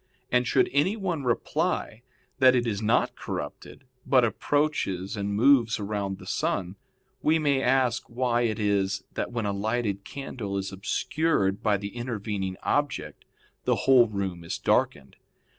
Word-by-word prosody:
And 125 0 +2
should - - +3
anyone 175 +1 0
reply 120 -1 -1 0.4
that 130 -1 +6
it 120 -1 +1
is 105 -3 -2
not 110 +1 +2
corrupted, 75 - -7 0.2
but 130 -2 +4
approaches 115 -8 -1
and 100 0 -2
moves 115 0 +4
around 100 -1 -2
with 95 - -9
the - - -11
sun, 95 0 -2 0.5
we 155 +1 +3
may 145 -4 +1
ask 125 -2 +1
why 120 0 0
it 110 -3 0
is 100 -2 0
that - - -3
when 115 -3 -2
a 100 - 0
lighted 105 -1 -1
candle 115 -7 -5
is 95 0 -3
obscured 100 - 0
by 105 -2 +2
the 100 +2 -7
intervening 105 -6 -3
object 145 0 -1 0.4
the - - +3
whole 130 -3 +6
room 95 -5 -4
is 85 - -4
darkened? 70 -2 0
110 Hz, 150 wpm, -27 LUFS, 100-130 Hz, 0.5 s, that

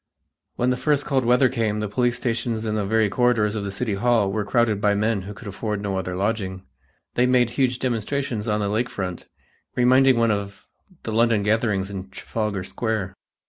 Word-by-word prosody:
When 125 +1 +1
the 125 - 0
first 145 0 +1
cold 135 -3 +1
weather 125 +2 +5
came 115 -4 -1
the 105 - -2
police 120 +4 0
stations 115 -2 -2
and 110 -1 -1
the 105 -2 -1
very 110 0 +3
corridors 110 -1 +2
of 105 -2 -3
the 100 - -3
city 105 +2 -2
hall 110 -1 +2
were 105 +1 -1
crowded 110 -1 +1
by 105 -1 +3
men 105 0 +1
who 100 +3 -8
could 110 - -11
afford 105 +1 -3
no 100 -1 -3
other 90 -1 -3
lodging. 95 -1 -2 0.5
They 125 +1 +3
made 125 -2 +3
huge 125 -1 +1
demonstrations 125 -1 -2
on 105 -1 0
the 100 - 0
lake 115 +4 0
front, 90 -3 -5 0.5
reminding 130 +1 +5
one 115 -1 +3
of 100 -1 -4 0.4
the 110 - -4
London 115 -2 +3
gatherings 105 -2 +1
in 95 -1 -6
Trafalgar 105 0 -3
Square. 105 -2 -3
110 Hz, 195 wpm, -23 LUFS, 100-120 Hz, 0.5 s, weather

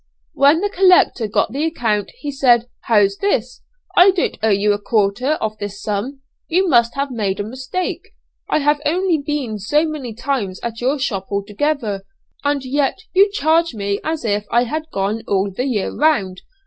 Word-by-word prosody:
When 290 +4 +4
the 410 - 0
collector 365 - +4
got 205 - 0
the 280 +5 -2
account, 230 - -1
he 290 - -3
said, 245 -4 +3 0.2
'How's 205 -3 +3
this? 255 - -1 0.3
I 360 +2 +8
don't 375 -2 0
owe 220 - +2
you 205 0 +3
a 205 - -3
quarter 215 +6 +1
of 220 -8 -3
this 205 -1 -6
sum; 220 +8 -4 0.3
you 370 +3 +2
must 235 -6 +3
have 275 0 -2
made 205 -5 -2
a - - -1
mistake. 260 - -5 0.3
I - - +2
have 295 +1 +2
only 340 +2 +1
been 280 -7 -3
so 295 +11 +1
many 280 -8 -5
times 230 -7 -2
at 230 0 -5
your 265 +4 +1
shop 200 -8 -3
altogether, 210 +2 -2 0.4
and 285 -2 0
yet 275 +1 0 0.2
you 400 +2 +5
charge 330 - +1
me 200 -1 -2
as 315 -4 -3
if 205 -1 -1
I 240 +1 +3
had 310 +6 -4
gone 200 +3 -1
all 195 0 0
the 245 +7 -3
year 225 -8 -1
round.' 210 -12 +1
250 Hz, 180 wpm, -19 LUFS, 205-300 Hz, 0.4 s, I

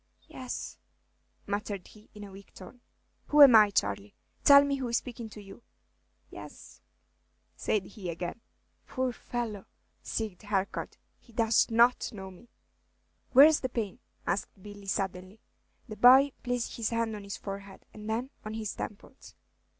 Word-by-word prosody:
"Yes," 255 -1 -7 0.7
muttered 205 -1 -4
he, 215 0 -18
in 210 - -9
a 200 - -10
weak 195 0 -15
tone. 240 +6 -13 0.5
"Who 295 0 +8
am 260 -5 +9
I, 210 -1 +7
Charley? 100 - -2 0.3
Tell 280 0 +8
me 280 -1 -1
who 260 -2 -3
is 235 0 +1
speaking 235 -3 -7
to 210 -1 -11
you." 195 +3 -13 0.7
"Yes," - - -12 0.7
said 205 -3 -1
he 195 -4 -8
again. 175 +6 -5 0.5
"Poor 255 -1 -2
fellow!" 225 -5 -5 0.5
Bighed 215 -5 -4
Harcourt, 200 -2 -3 0.2
"he 235 - -22
does 225 +1 +2
not 235 +2 +3
know 190 -3 -9
me!" 190 +6 -17 0.8
"Where's 295 +4 +8
the 255 - -3
pain?" 220 -5 -4 0.3
asked 175 +4 -1
Billy, 205 0 -12
suddenly. 190 +1 -3 0.5
The 215 -2 -8
boy 260 +5 +7
placed 245 -1 -3
his 225 -2 -1
hand 230 -1 -1
on 205 - -8
his 200 0 -6
forehead, 195 -1 -9
and 210 0 -9
then 240 +5 -2
on 215 +1 -6
his 220 -2 -4
temples. 220 +5 -9
215 Hz, 150 wpm, -29 LUFS, 195-240 Hz, 0.8 s, am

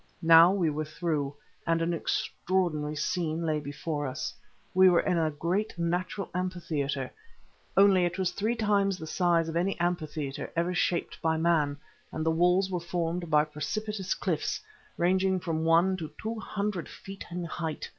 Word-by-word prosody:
Now 165 +2 +8
we 180 -5 +1
were 155 +1 -2
through, 150 -3 -2 0.3
and 165 0 +3
an 165 +1 0
extraordinary 165 -3 -1
scene 165 +1 -1
lay 155 -1 +1
before 145 +1 -4
us. 130 - -4 0.4
We 185 0 +7
were 175 - +4
in 180 -3 +1
a 160 -1 +2
great 175 +7 -2
natural 180 +3 -1
amphitheatre, 160 -7 -2 0.7
only 195 -2 +6
it 175 0 -2
was 185 -1 0
three 220 +4 -1
times 200 -3 +2
the 160 - -7
size 170 0 +2
of 165 - -4
any 180 +3 0
amphitheatre 155 -5 -2
ever 170 +2 +1
shaped 175 0 -1
by 160 0 +1
man, 160 -3 +2 0.3
and 155 - -3
the 160 - +3
walls 180 +3 +3
were 180 - 0
formed 170 0 -3
of 150 0 +3
precipitous 210 +5 -2
cliffs, 170 -6 -1 0.4
ranging 185 +2 +2
from 160 -2 -2
one 170 +3 +4
to 160 -4 -5
two 220 +1 -4
hundred 200 -5 -3
feet 195 0 -9
in 175 0 -4
height. 165 -1 -4
170 Hz, 165 wpm, -29 LUFS, 160-185 Hz, 0.7 s, Now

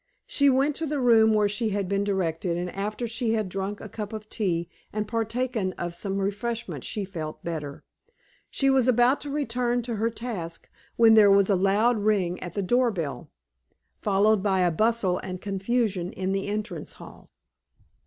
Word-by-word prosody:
She 280 -1 +3
went 275 +2 +2
to 325 - -2
the 295 0 -1
room 225 -3 +5
where 210 -1 +3
she 215 +2 -1
had 200 -2 -1
been 200 +1 0
directed, 175 -3 -1
and 180 0 -3
after 210 +4 -3
she 230 0 -1
had 215 -3 0
drunk 195 +2 -4
a - - -8
cup 210 0 -6
of 215 -1 -7
tea 175 -6 -1 0.2
and 210 0 -3
partaken 225 -2 -1
of 175 -1 -5
some 195 +2 -3
refreshment 210 +4 -3
she 210 -3 -3
felt 160 -5 -7
better. 150 -4 -5 0.7
She 275 -1 +2
was 260 -2 +3
about 250 +2 +4
to 290 - -4
return 245 -4 -1
to 235 -2 -3
her 225 +2 +1
task, 215 -8 -6 0.2
when 230 -1 +6
there 215 -2 +7
was 200 0 +5
a - - +4
loud 205 +5 +2
ring 195 -4 +1
at 175 -2 -7
the 200 - -1
door 245 +5 +3
bell, 165 -9 -4 0.7
followed 205 +1 +3
by 190 -2 +1
a 175 -1 +3
bustle 215 0 +1
and 185 -1 -6
confusion 195 -1 -1
in 190 0 -2
the 195 0 -1
entrance 210 +2 -4
hall. - - -13
210 Hz, 185 wpm, -26 LUFS, 190-235 Hz, 0.7 s, there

